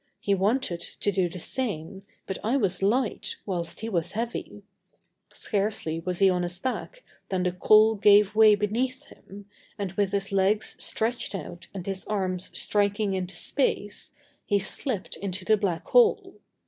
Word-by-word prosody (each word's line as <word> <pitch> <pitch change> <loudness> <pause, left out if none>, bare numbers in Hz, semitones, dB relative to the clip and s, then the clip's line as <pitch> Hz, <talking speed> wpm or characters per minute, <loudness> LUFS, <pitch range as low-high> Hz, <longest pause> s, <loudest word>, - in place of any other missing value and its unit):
He 200 - 0
wanted 195 -2 0
to 205 - -2
do 185 -3 +1
the 170 - -8
same, 190 -3 -3 0.2
but 190 - -4
I 235 +6 +2
was 195 -7 0
light, 225 +4 0
whilst 175 -3 -3
he 225 - -3
was 175 -7 -1
heavy. 230 +2 -4 0.7
Scarcely 200 -6 -2
was 180 +1 -3
he 195 - +5
on 180 -1 +2
his 175 0 -3
back 260 - -4 0.3
than 185 -2 0
the 180 - +1
coal 215 +4 +5
gave 205 0 +5
way 215 -1 +7
beneath 225 +5 -2
him 200 +1 -13 0.3
and, 200 -3 -3
with 195 0 0
his 200 -1 -2
legs 195 +2 +1
stretched 230 -1 -1
out 175 -2 -8
and 190 -3 -7
his 195 -1 -3
arms 185 -3 -2
striking 205 0 +1
into 185 -1 -3
space, 230 - -1 0.3
he 205 - +1
slipped 200 +2 -3
into 185 -1 -3
the 215 - +5
black 195 -5 -2
hole. 485 -3 +3
200 Hz, 160 wpm, -26 LUFS, 185-215 Hz, 0.7 s, way